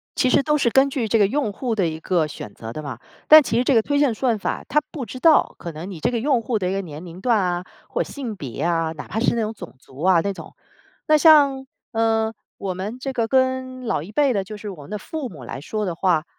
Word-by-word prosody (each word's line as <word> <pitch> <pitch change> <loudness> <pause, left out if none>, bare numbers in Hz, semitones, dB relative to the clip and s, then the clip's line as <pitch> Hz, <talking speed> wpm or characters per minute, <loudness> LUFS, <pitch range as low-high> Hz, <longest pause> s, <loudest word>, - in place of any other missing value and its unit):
其 255 - +2
实 - - +4
都 300 0 +2
是 275 -5 +2
根 270 +3 +4
据 260 -5 -2
这 225 +1 +2
个 200 - +5
用 260 -2 -1
户 240 +1 -2
的 190 -5 +1
一 160 0 -4
个 165 -1 +1
选 105 -8 -9
择 115 0 -8
的 155 - -5
嘛。 140 -3 -7 0.3
但 310 0 +10
其 230 - -1
实 245 - +3
这 265 0 +2
个 225 - +6
推 285 +5 0
荐 285 -5 +3
算 235 0 0
法， - - -3
它 300 - +2
不 275 -6 -5
知 255 +4 -8
道 320 +2 +4
可 170 - -6
能 165 +4 -7
你 175 - -8
这 - - +1
个 235 - -1
用 260 0 +2
户 230 0 -1
的 180 -2 -1
一 - - -1
个 195 - -1
年 160 -2 -9
龄 175 +1 -10
段 235 -1 +3
啊， 180 -2 -1 0.2
或 - - -1
性 250 -7 -6
别 135 - -7
啊， 165 -1 +1
哪 155 - -9
怕 220 - -3
是 235 - +2
那 230 - 0
种 215 0 -2
种 175 -9 -11
族 135 +1 -14
啊 180 -2 +5
那 200 +3 -2
种。 - - -11 0.5
那 310 -1 +6
像， 285 -4 +5 0.3
呃， 225 -1 +1 0.2
我 195 -2 -3
们 200 +6 -5
这 270 +1 -4
个 230 -3 0
跟 260 0 0
老 215 - 0
一 185 - -10
辈 275 +3 +2
的， 200 -3 0
就 210 +2 -8
是 210 0 -7
我 180 -7 -9
们 - - -13
的 210 - -3
父 280 +6 -5
母 150 - -11
来 130 +3 -7
说 215 +7 -3
的 175 -3 -3
话， 170 -3 +1
220 Hz, 295 characters per minute, -22 LUFS, 175-260 Hz, 0.5 s, 但